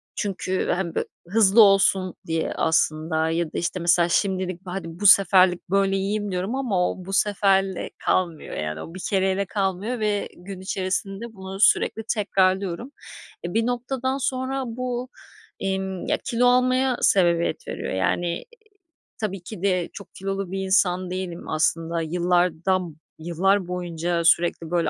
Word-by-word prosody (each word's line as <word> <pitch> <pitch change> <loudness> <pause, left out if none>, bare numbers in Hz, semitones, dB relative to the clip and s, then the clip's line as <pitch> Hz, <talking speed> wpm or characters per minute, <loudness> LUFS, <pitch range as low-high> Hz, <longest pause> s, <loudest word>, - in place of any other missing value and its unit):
Çünkü 190 -2 -2
hem 175 -3 -3
bö - - +1 0.2
hızlı 210 +2 +5
olsun 195 -2 +4
diye 165 0 -1
aslında 160 0 +1
ya 170 +1 0
da, - - -3
işte, 175 +2 -2
mesela, 170 0 +3
"Şimdilik, 185 -1 0
hadi, 180 -2 -5
bu 205 - +4
seferlik 185 -3 +5
böyle 195 0 +2
yiyeyim." 205 +1 -2
diyorum 185 +7 -2
ama 205 -10 0
o 185 - -9
bu 195 - -6
seferle 195 -2 +1 0.2
kalmıyor, 170 -4 -1
yani, 75 0 -4
o 165 - -9
bir 185 - -7
kereyle 190 0 +1
kalmıyor 195 +5 -2
ve 210 -2 -1
gün 185 +1 -9
içerisinde 195 +4 -3
bunu 190 -1 -8
sürekli 220 +1 +3
tekrarlıyorum. 190 +2 0 0.5
Eee, 175 - -4
bir 225 +1 +1
noktadan 255 +2 -2
sonra 265 0 -2
bu, 250 +1 -4 0.5
emm, 190 -1 -3
ya - - +1
kilo 245 -1 +2
almaya 255 0 +3
sebebiyet 170 -3 +2
veriyor. - - -4
Yani, 130 - -1 0.7
tabii 195 -4 -3
ki 180 -1 -9
de 185 -3 0
çok 200 - -11
kilolu 195 -1 -4
bir 195 - -3
insan 185 -1 +2
değilim 185 -2 -5
aslında. 165 +2 0
Yıllardan 175 0 0 0.2
yıllar 180 +4 +1
boyunca 175 -1 -2
sürekli, 170 -1 +2
böyle, 175 -1 +1
190 Hz, 145 wpm, -24 LUFS, 175-205 Hz, 0.7 s, hızlı